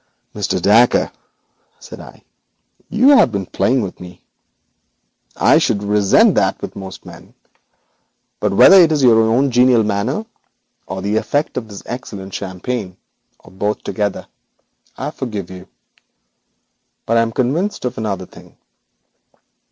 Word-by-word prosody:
'Mr. -, -, -2 dB
Dacre,' 115 Hz, +4 st, +3 dB, 0.7 s
said -, -, -12 dB
I, -, -, -14 dB, 0.7 s
'you 245 Hz, +6 st, +3 dB
have 275 Hz, -, +5 dB
been 100 Hz, -2 st, -3 dB
playing 125 Hz, +6 st, 0 dB
with 95 Hz, -, -7 dB
me. 90 Hz, -1 st, -13 dB, 1.1 s
I -, -, +4 dB
should 100 Hz, -, -1 dB
resent 105 Hz, -1 st, +3 dB
that -, -, 0 dB
with -, -, -8 dB
most 95 Hz, -1 st, -10 dB
men, -, -, -14 dB, 1.0 s
but -, -, -1 dB
whether 190 Hz, -, +7 dB
it 165 Hz, -2 st, +4 dB
is 150 Hz, -3 st, 0 dB
your 115 Hz, -3 st, +5 dB
own 120 Hz, +5 st, +1 dB
genial 125 Hz, -1 st, +4 dB
manner 110 Hz, -, -2 dB, 0.6 s
or 95 Hz, 0 st, -6 dB
the 105 Hz, +2 st, 0 dB
effect 120 Hz, +7 st, -1 dB
of 125 Hz, -3 st, -4 dB
this 100 Hz, -2 st, -11 dB
excellent 100 Hz, -6 st, -8 dB
champagne, 95 Hz, +1 st, -5 dB, 0.4 s
or -, -, -18 dB
both 105 Hz, +3 st, -3 dB
together, 105 Hz, -2 st, -3 dB, 0.7 s
I 145 Hz, +3 st, -4 dB
forgive 105 Hz, -, -6 dB
you. 95 Hz, 0 st, -11 dB, 1.4 s
But 115 Hz, -, +1 dB
I -, -, +4 dB
am 115 Hz, 0 st, -1 dB
convinced 140 Hz, -, -2 dB
of 125 Hz, 0 st, -3 dB
another 100 Hz, -4 st, -4 dB
thing. -, -, -18 dB
110 Hz, 135 wpm, -17 LUFS, 100-125 Hz, 1.4 s, whether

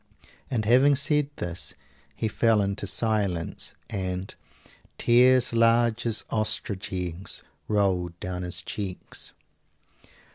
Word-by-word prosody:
And 115 Hz, -5 st, -1 dB
having 130 Hz, +5 st, +5 dB
said 145 Hz, 0 st, +2 dB
this 85 Hz, 0 st, -4 dB, 0.4 s
he 110 Hz, -, -1 dB
fell 110 Hz, 0 st, +3 dB
into 100 Hz, +1 st, -2 dB
silence, 100 Hz, -5 st, -1 dB
and 95 Hz, -1 st, -3 dB, 0.6 s
"tears 125 Hz, +1 st, +5 dB
large 115 Hz, 0 st, +3 dB
as 115 Hz, -1 st, 0 dB
ostrich 110 Hz, -3 st, -2 dB
eggs 90 Hz, 0 st, -3 dB, 0.2 s
rolled 90 Hz, -5 st, 0 dB
down 90 Hz, 0 st, -4 dB
his 90 Hz, -1 st, -2 dB
cheeks." 95 Hz, -3 st, -5 dB
105 Hz, 105 wpm, -26 LUFS, 90-120 Hz, 0.6 s, having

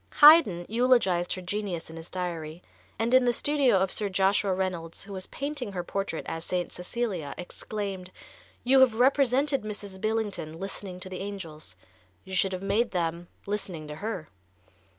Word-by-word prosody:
Haydn 290 Hz, -, +8 dB
eulogized 225 Hz, -7 st, +3 dB
her 185 Hz, -, -6 dB
genius 185 Hz, -3 st, -3 dB
in -, -, -9 dB
his 165 Hz, 0 st, -9 dB
diary, 170 Hz, -2 st, -4 dB, 0.3 s
and 230 Hz, +3 st, 0 dB
in 255 Hz, 0 st, +7 dB
the 245 Hz, -, +4 dB
studio 275 Hz, -2 st, +3 dB
of 190 Hz, 0 st, +1 dB
Sir 205 Hz, -2 st, -1 dB
Joshua 195 Hz, +1 st, +2 dB
Reynolds, 185 Hz, -3 st, -3 dB
who 200 Hz, -, -9 dB
was 185 Hz, -1 st, -4 dB
painting 280 Hz, -7 st, -4 dB
her 180 Hz, -2 st, -3 dB
portrait 195 Hz, -2 st, -3 dB
as 165 Hz, 0 st, -4 dB
St. 180 Hz, -1 st, -2 dB
Cecilia, 180 Hz, -5 st, -3 dB
exclaimed: 190 Hz, 0 st, -5 dB, 0.5 s
"You 265 Hz, +2 st, +5 dB
have 260 Hz, -4 st, +6 dB
represented 270 Hz, +2 st, +3 dB
Mrs. 205 Hz, -2 st, -7 dB
Billington 215 Hz, -7 st, -1 dB
listening 195 Hz, -1 st, -5 dB
to 185 Hz, -, -4 dB
the 185 Hz, -, -6 dB
angels, 165 Hz, -, -7 dB, 0.5 s
you 190 Hz, -, -10 dB
should 190 Hz, 0 st, +2 dB
have 185 Hz, 0 st, -4 dB
made 215 Hz, +4 st, +2 dB
them 170 Hz, -2 st, -2 dB, 0.2 s
listening 190 Hz, -6 st, -4 dB
to 150 Hz, -, -6 dB
her." 195 Hz, -6 st, -4 dB
195 Hz, 165 wpm, -28 LUFS, 175-225 Hz, 0.5 s, Haydn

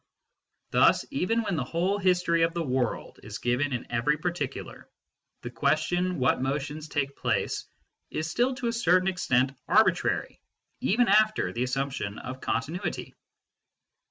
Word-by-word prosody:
Thus -, -, +4 dB
even 230 Hz, -3 st, 0 dB
when 200 Hz, -4 st, -1 dB
the 140 Hz, -, -1 dB
whole 180 Hz, +9 st, 0 dB
history 180 Hz, -3 st, +2 dB
of 165 Hz, +1 st, +2 dB
the 170 Hz, -, 0 dB
world 130 Hz, -4 st, -2 dB
is 105 Hz, 0 st, -7 dB
given 125 Hz, +4 st, 0 dB
in 125 Hz, -2 st, -3 dB
every 120 Hz, +6 st, +1 dB
particular, 170 Hz, -4 st, -4 dB, 0.5 s
the 120 Hz, -, -5 dB
question 165 Hz, +7 st, +1 dB
what 125 Hz, -1 st, +2 dB
motions 145 Hz, +3 st, -3 dB
take 140 Hz, -2 st, -2 dB
place -, -, -1 dB, 0.4 s
is 155 Hz, -, -3 dB
still 245 Hz, +10 st, +1 dB
to 250 Hz, -, -3 dB
a 230 Hz, -, 0 dB
certain 185 Hz, -5 st, +3 dB
extent 130 Hz, -8 st, +2 dB, 0.2 s
arbitrary -, -, +2 dB, 0.4 s
even 235 Hz, +4 st, +2 dB
after 215 Hz, +2 st, +3 dB
the 120 Hz, -, -3 dB
assumption 130 Hz, -5 st, -2 dB
of 130 Hz, +1 st, -7 dB
continuity. 155 Hz, +9 st, -3 dB
155 Hz, 140 wpm, -27 LUFS, 130-185 Hz, 0.5 s, Thus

